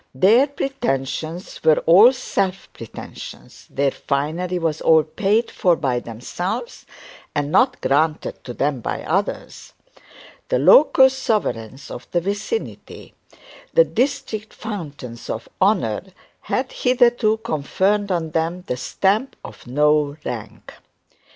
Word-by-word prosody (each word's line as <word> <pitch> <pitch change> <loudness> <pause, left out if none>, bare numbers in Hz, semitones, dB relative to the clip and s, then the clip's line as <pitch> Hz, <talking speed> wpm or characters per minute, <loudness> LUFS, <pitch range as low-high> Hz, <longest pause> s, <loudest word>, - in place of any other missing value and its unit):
Their 220 - +5
pretensions 165 - -4
were 155 - +5
all 200 +9 +8
self 195 -7 -3
pretensions, - - -10
their 140 0 0
finery 160 +8 -2
was 160 -3 -2
all 160 -1 +5
paid 210 +8 0
for 180 -2 +2
by 130 -6 -1
themselves 150 - -5 0.5
and 145 0 -1
not 255 +5 +3
granted 150 +4 0
to 120 - -7
them 140 -2 0
by - - -4
others. 195 +5 -3 0.8
The - - +2
local 295 - +7
sovereigns 165 - -2
of - - -8
the 175 - +1
vicinity, 205 - -5 0.6
the - - +8
district 220 -3 -2
fountains 145 - -7
of 110 - -4
honour, 185 - +1 0.3
had 255 +1 -2
hitherto 240 -3 +2
conferred 200 +2 0
on 165 -3 -1
them 165 +3 -2
the 125 - -3
stamp 200 - 0
of - - -12
no 150 +2 +2
rank. 115 -4 -7
175 Hz, 120 wpm, -21 LUFS, 145-220 Hz, 0.8 s, all